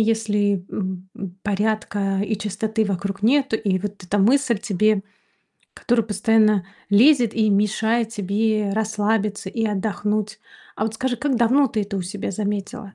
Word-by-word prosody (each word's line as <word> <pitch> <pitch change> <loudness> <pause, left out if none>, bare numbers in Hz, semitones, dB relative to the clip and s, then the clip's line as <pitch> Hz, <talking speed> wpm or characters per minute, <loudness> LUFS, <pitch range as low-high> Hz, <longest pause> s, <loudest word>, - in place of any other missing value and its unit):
если, 210 -4 +1
м, 185 -1 -4
м, 185 -2 -7
порядка 205 -1 -1
и 210 0 -1
чистоты 215 +2 -1
вокруг 195 0 -3
нету. 265 0 +3
И 195 -4 0
вот 205 -2 -6
эта 205 +3 -1
мысль 245 +3 +3
тебе, 210 -1 +1 0.7
которую 235 -2 +1
постоянно 215 -2 +2 0.2
лезет 240 +2 +5
и 220 -1 +2
мешает 220 +3 +1
тебе 210 0 0
расслабиться 210 -2 -1
и 225 +3 -2
отдохнуть. 210 +1 -2 0.3
А, - - -4
вот 220 0 -1
скажи, 250 +1 -1
как 275 0 0
давно 255 +4 +3
ты 215 -2 -1
это 200 0 -5
у - - -2
себя 195 +2 -5
заметила? 200 0 -4
210 Hz, 150 wpm, -22 LUFS, 200-225 Hz, 0.7 s, лезет